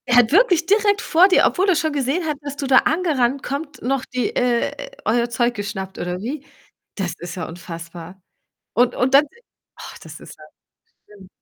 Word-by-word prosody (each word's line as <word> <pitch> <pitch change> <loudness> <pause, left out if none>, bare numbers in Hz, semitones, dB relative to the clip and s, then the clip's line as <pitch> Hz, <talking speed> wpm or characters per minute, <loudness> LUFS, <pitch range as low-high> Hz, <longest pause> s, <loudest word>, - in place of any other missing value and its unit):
Er 245 - +2
hat 245 -1 +5
wirklich 355 -3 +4
direkt 410 +2 +2
vor 350 +4 +5
dir, 380 - +4
obwohl 385 +2 +1
er 370 - +4
schon 315 -1 0
gesehen 285 +5 -1
hat, 305 -2 -2
dass 285 -1 -6
du 285 - -4
da 260 -1 +5
angerannt 280 -6 0
kommt, 290 +2 -5
noch 270 +1 -1
die 250 -3 -3
äh, 250 - -1
euer 235 +2 +1
Zeug 240 0 0
geschnappt 205 -3 -6
oder 180 0 -3
wie? 265 +8 -5 0.5
Das 185 -5 -3
ist 175 0 -7
ja 180 -3 -5
unfassbar 170 +1 -10 0.6
und 245 +1 +3
und 260 +2 +1
dann 280 +2 +7 0.5
ach, - - -10
das - - -11
ist - - -12
ja - - -14 0.6
schlimm. 200 -3 -16
255 Hz, 190 wpm, -21 LUFS, 205-310 Hz, 0.6 s, dann